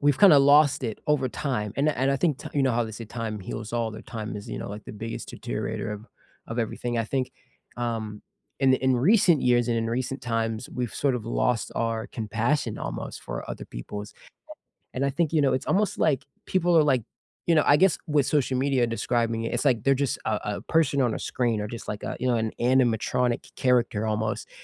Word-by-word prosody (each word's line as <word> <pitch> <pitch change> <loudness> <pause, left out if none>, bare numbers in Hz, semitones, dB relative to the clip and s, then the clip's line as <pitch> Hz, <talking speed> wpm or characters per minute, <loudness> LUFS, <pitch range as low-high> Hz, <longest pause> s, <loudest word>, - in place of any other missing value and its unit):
we've 145 -2 +3
kind 200 -4 +8
of 140 -2 +7
lost 145 0 +5
it 115 -4 -3
over 145 -3 +2
time, 115 -6 -2
and 140 +2 +2
I 155 - +3
and 135 +2 +1
I 140 - +2
think 150 -2 +1
t - - -7
you 140 - +1
know 130 - +2
how 120 +1 +2
they 110 - -6
say 110 +1 -7
time 110 -1 -4
heals 105 +3 -6
all, 115 -1 0
that 110 - -10
time 110 -2 -5
is, 100 - -8
you - - -4
know, - - -5
like 105 +1 -7
the - - -8
biggest 115 +2 -6
deteriorator - - -4
of 105 +2 -8 0.4
of 115 - -4
everything 120 +1 -2
I 115 - +1
think, 130 +2 -2 0.5
um, 115 -3 -3 0.4
in 135 -1 +5
in 130 -1 +2
recent 175 - +4
years 120 -1 +3
and 115 - +1
in 115 0 0
recent 130 +3 -2
times, 115 -1 -2
we've 125 -3 -4
sort 140 -2 +1
of 115 -3 -4
lost 115 0 0
our 115 -1 -1
compassion 115 +3 -1
almost - - -5
for - - -6
other - - -6
people's 105 +12 -7 0.8
And 135 +2 0
I 140 - +2
think, 155 +3 0
you 160 - +3
know, 135 - +3
it's 130 - -1
almost 205 +2 +1
like 145 -5 +2 0.2
people 175 -2 +2
are 160 - +7
like 130 -5 +2 0.5
you 165 - +5
know, 155 - +5
I 145 - +6
guess 185 +1 +4
with 150 -3 +3
social 135 -3 +1
media 130 -3 +2
describing 115 0 0
it, 115 - -2
it's - - -1
like 120 -6 +2
they're 135 - +5
just - - -2
a 110 - +1 0.2
a - - -6
person 150 -4 +2
on 120 -4 +2
a - - -3
screen 115 -4 -1
or 105 - -3
just 115 0 -7
like 105 - -4
a, - - -4
you 130 - -2
know, 125 - +3
an 110 -1 0
animatronic 125 -1 +1
character 120 -4 +2
almost, 110 0 -2
120 Hz, 230 wpm, -26 LUFS, 115-140 Hz, 0.8 s, kind